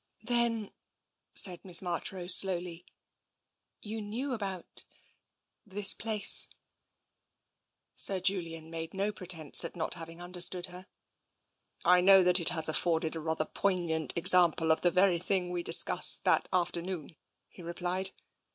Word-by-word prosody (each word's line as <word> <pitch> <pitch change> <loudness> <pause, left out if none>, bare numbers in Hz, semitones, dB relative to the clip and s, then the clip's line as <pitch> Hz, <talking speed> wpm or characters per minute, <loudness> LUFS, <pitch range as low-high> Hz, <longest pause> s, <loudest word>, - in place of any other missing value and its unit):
" - - -38
Then," 230 -3 -2 0.6
said 180 -3 +2
Miss 180 -3 0
Marchrose 180 0 -1
slowly, 180 -2 -1 0.5
" - - -55
you 220 +1 -8
knew 240 +7 -6
about 195 -6 -8 0.4
— - - -55
this 205 0 +2
place? 215 -2 +3 0.8
" - - -55
Sir 195 -1 +5
Julian 165 -4 -4
made 165 +1 -8
no 200 +2 -3
pretence 175 -7 -2
at - - -8
not 165 -2 -5
having 165 -1 -11
under 175 0 -9
stood 180 0 +4
her. 180 +1 -13 0.5
" - - -31
I 180 - +1
know 195 0 +4
that 180 +1 +4
it 170 - +3
has 160 -2 0
afforded 160 0 -3
a - - -6
rather 160 0 -4
poignant 170 -5 -3
ex 170 +2 +4
ample 170 -2 +1
of 160 - 0
the 175 - +2
very 185 -1 +1
thing 180 0 -2
we 175 -1 -5
discussed - - +6
that - - 0
afternoon," 175 -2 -5 0.3
he - - -17
replied. 180 +2 -5
180 Hz, 150 wpm, -28 LUFS, 170-195 Hz, 0.8 s, discussed